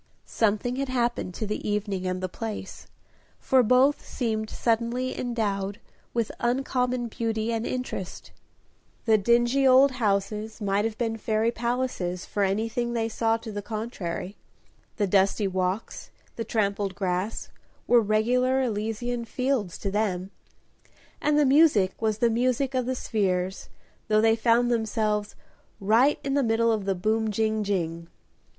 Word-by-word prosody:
Something 225 +3 0
had 275 -1 -2
happened 240 -7 -1
to 220 - -3
the 210 0 -3
evening 200 -3 -2
and 185 0 -3
the - - 0
place, 210 0 -7 0.5
for 260 -1 +3
both 255 +5 +3
seemed 220 -3 -2
suddenly 235 +2 -1
endowed 205 -5 -2 0.3
with 230 -2 -1
uncommon 250 0 0
beauty 225 0 -2
and 225 0 -2
interest. 250 -7 -5 0.7
The 220 -2 +4
dingy 240 +5 +3
old 265 +2 +6
houses 210 -2 -1
might 205 0 0
have 225 -1 -3
been 225 -2 -1
fairy 220 +1 0
palaces, 235 -7 -2
for 205 - -3
anything 225 +5 0
they 225 -1 -1
saw 225 0 +1
to 225 -1 -8
the 205 0 -4
contrary; 205 -4 -5 0.6
the 210 - +2
dusty 195 +1 +2
walks, 185 +2 -3 0.3
the 230 - -3
trampled 200 -3 -1
grass, 185 +2 -2 0.4
were 240 -1 +5
regular 245 +5 +2
Elysian 230 +1 -2
fields 250 -6 -1
to 195 - -3
them, 195 -3 -1 0.9
and 300 0 +2
the 300 - +4
music 265 -10 +4
was 215 -2 +1
the 235 +1 +2
music 255 +3 +1
of 255 -2 0
the 260 - 0
spheres, 190 -5 -1 0.4
though 215 -1 +3
they 225 +1 +4
found 235 +1 +3
themselves 215 -2 -1 0.4
"Right 230 +8 +4
in 275 - -1
the 280 - +3
middle 230 -1 +2
of 215 -3 -1
the 195 -1 0
boom, 220 +4 0
jing, 220 0 0
jing." 170 -4 -2
225 Hz, 145 wpm, -26 LUFS, 205-240 Hz, 0.9 s, old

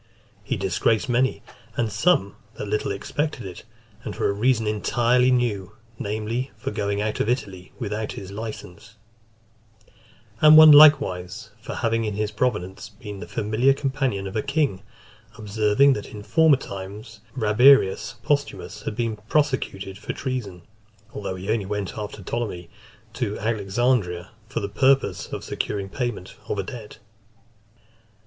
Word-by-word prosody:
He - - -2
disgraced 115 +2 0
many, 125 +2 +1 0.3
and 115 -2 0
some 105 - +2 0.2
that 105 - -6
little 105 0 -1
expected 140 +9 -3
it, 90 +1 -9 0.4
and 105 - -6
for - - 0
a 100 - +1
reason 115 +2 +1
entirely 120 +4 +2
new, 105 -6 0 0.3
namely, 110 +5 -3
for 110 - -4
going 100 -1 -2
out 105 +1 -2
of 110 - 0
Italy 95 -7 -3
without 110 -2 -3
his 95 -1 -8
license; 105 -4 -8 1.4
(308) 155 - +5
and 155 0 +10
one 155 -1 +10
likewise, 110 -9 +5
for 115 - -6
having 115 -1 0
in 105 -2 -2
his 105 0 -2
province 105 -3 -2
been 105 -2 -9
the 105 - -8
familiar 110 +6 +2
companion 135 -8 -1
of 95 - -6
a 110 - +1
king; 140 -9 0 0.6
observing, 110 +5 +3
that, 105 - -5
in 105 -1 -9
former 145 +7 +4
times, 100 -1 -8 0.2
Rabirius 125 +1 +4
Posthumus 145 +3 -2
had - - -5
been 115 -2 -2
prosecuted 125 -10 -1
for - - -5
treason, 105 -9 -5 0.5
although 100 -2 -4
he 95 +3 -4
only 110 -4 -1
went 105 -2 -3
after 105 -1 -6
Ptolemy 90 -5 -4 0.4
to 110 -3 -3
Alexandria 100 -3 0 0.2
for 130 - -3
the 100 - -2
purpose 130 +6 +2
of - - -6
securing 100 -1 -3
payment 120 -4 -4
of - - -1
a 100 - -1
debt. 110 0 -9
110 Hz, 145 wpm, -24 LUFS, 100-125 Hz, 1.4 s, and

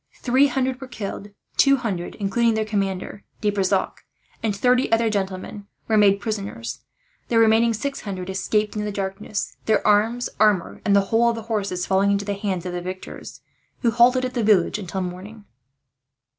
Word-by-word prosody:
Three 260 +3 +4
hundred 265 -1 -1
were 265 - -7
killed. 205 -4 -6 0.3
Two 275 0 +6
hundred, 205 -9 -4
including 225 +3 +1
their 220 0 0
commander, 195 -2 -3 0.2
De 210 -2 +1
Brissac, 195 -1 0 0.4
and 220 -3 -1
thirty 250 +4 +2
other 225 -1 +3
gentlemen, 200 0 -4 0.2
were 220 - +2
made 200 -2 +5
prisoners. 200 - -4 0.5
The 235 - +1
remaining 225 +1 +5
six 275 +6 -4
hundred 185 -3 -5
escaped 210 +3 -1
in 210 - -2
the 210 - -3
darkness; 200 +1 -4
their 220 - +2
arms, 220 +4 +3
armour, 210 -5 +2
and 200 - +4
the 200 - +6
whole 235 +1 +4
of 235 - -1
the 225 - -6
horses 200 -5 -2
falling 195 +1 +2
into 200 0 +1
the 205 - -1
hands 195 -3 -3
of 180 - -4
the 175 - -3
victors, 185 +1 -8 0.4
who 235 - +3
halted 250 +3 +4
at 255 - -4
the 240 - -1
village 210 -2 +3
until 190 -1 -4
morning. 190 +4 -7
210 Hz, 180 wpm, -23 LUFS, 195-230 Hz, 0.5 s, Two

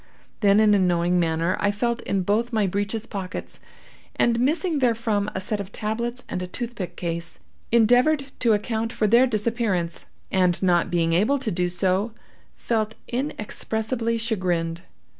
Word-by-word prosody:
Then, 205 -1 +5
in 215 -1 +5
a 205 - +4
knowing 175 -1 +2
manner, 165 +1 +1
I 205 - +2
felt 235 +3 -1
in 195 -2 -1
both 220 +6 0
my 215 -3 +2
breeches 205 +4 -2
pockets, 195 -4 -6 0.6
and, 235 0 +2
missing 310 +5 +1
therefrom 225 -4 +1
a - - -1
set 210 +2 -2
of 200 0 -6
tablets 235 +4 -3
and 180 - -3
a 180 - -4
toothpick 225 -2 -5
case, 170 -1 -4 0.3
endeavored 250 +5 +4
to 230 -3 +3
account 220 +2 -1
for 220 - 0
their 235 +5 +5
disappearance, 215 -6 -1 0.2
and 180 -2 +2
not 175 -2 +3
being 165 -1 +1
able 215 +11 +3
to 255 -5 -3
do 180 +1 0
so, 190 +5 0 0.4
felt 220 -2 -1
inexpressibly 230 -2 -2
chagrined. 180 -7 -1
215 Hz, 155 wpm, -24 LUFS, 185-235 Hz, 0.6 s, Then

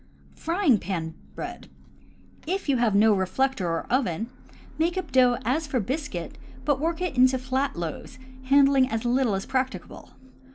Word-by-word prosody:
Frying 330 - +2
pan 165 -4 -4 0.2
Bread. - - -7 0.4
— - - -28
If 390 - -6
you 275 -2 +2
have 235 -4 +2
no 215 +1 +5
reflector 195 +3 0
or 165 0 -2
oven, 230 -3 0 0.5
make 340 +3 +1
up 350 -7 -4
dough 250 -2 +4
as 295 +6 0
for 265 -3 0
biscuit, 285 +8 -4 0.3
but 290 -3 +2
work 330 +3 -1
it 355 -6 -2
into 255 +1 +5
flat 260 +2 -1
loaves, 170 - -6 0.3
handling 275 -1 +5
as 225 +1 -3
little 240 -3 +2
as 195 - -3
practicable. 260 0 -3
260 Hz, 160 wpm, -26 LUFS, 220-280 Hz, 0.5 s, no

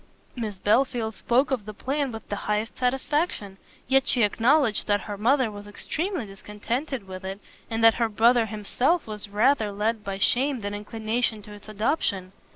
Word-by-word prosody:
Miss 220 -5 -4
Belfield 225 +2 +1
spoke 255 +6 +1
of 245 -6 -1
the 215 -1 -8
plan 275 +3 -1
with 225 -1 -8
the 205 - -3
highest 210 +2 -1
satisfaction; 255 - -1 0.3
yet 270 +1 +3
she 245 - +4
acknowledged 230 +3 +3
that 205 -1 +2
her 205 - -5
mother 240 +3 +2
was 205 0 -9
extremely 320 - -3
discontented 210 +5 -4
with 185 0 -8
it, 190 +1 -5 0.3
and 225 0 -1
that 225 0 +8
her 230 - +2
brother 230 +2 +4
himself 245 - 0
was 210 -1 -5
rather 215 +1 +2
led 210 +2 -1
by 195 -2 -4
shame 255 +5 +1
than 205 0 -4
inclination 220 +1 -2
to 210 - -11
its 205 +1 -13
adoption. 205 - -1
220 Hz, 170 wpm, -25 LUFS, 205-255 Hz, 0.3 s, that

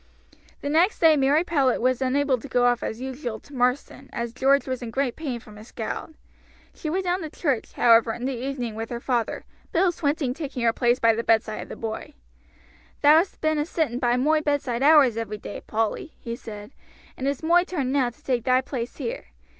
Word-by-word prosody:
The - - -4
next 335 +8 +3
day 320 -2 +6
Mary 285 +3 +3
Powlett 280 -7 +1
was 255 +1 +1
unable 265 0 +1
to 250 - -9
go 245 -2 +2
off 245 -1 +2
as 220 - -4
usual 255 -3 -5
to 285 - -17
Marsden 255 +1 -1
as 235 -1 -4
George 270 +2 +3
was 255 -1 -3
in 240 - -5
great 265 +1 -1
pain 270 -7 -4
from 210 -2 -14
his 215 +2 -12
scald. 235 +7 -6 0.6
She 310 - -5
went 375 +4 -1
down 360 +1 0
to 315 - -5
church, 280 -6 -2
however, 230 -1 +5
in 240 +2 -5
the 270 - -1
evening 250 -2 -4
with 225 +1 -5
her 235 - -4
father, 240 -2 -2 0.3
Bill 360 +2 +3
Swinton 290 -5 -1
taking 275 -4 -5
her 230 -1 +3
place 240 0 +2
by 230 -2 +4
the 230 +1 -2
bedside 220 -1 +1
of - - -9
the - - -6
boy. 225 +6 -6 0.9
"Thou 295 +2 +8
hast 365 +3 -3
been 310 -1 +1
a 295 - 0
sitting 295 -9 -1
by 245 -1 +2
moi 305 +4 +2
bedside 285 -5 -1
hours 280 -5 +6
every 215 -2 -3
day, 205 - -8
Polly," 225 +8 -2
he 235 0 -5
said, 210 -2 -9 0.4
"and 265 - -3
it's 280 +2 -2
moi 345 +2 +4
turn 290 -9 -2
now 265 -3 +2
to 240 - -20
take 245 -4 0
thy 255 0 +4
place 255 -2 -5
here. - - -4
260 Hz, 215 wpm, -25 LUFS, 235-295 Hz, 0.9 s, Thou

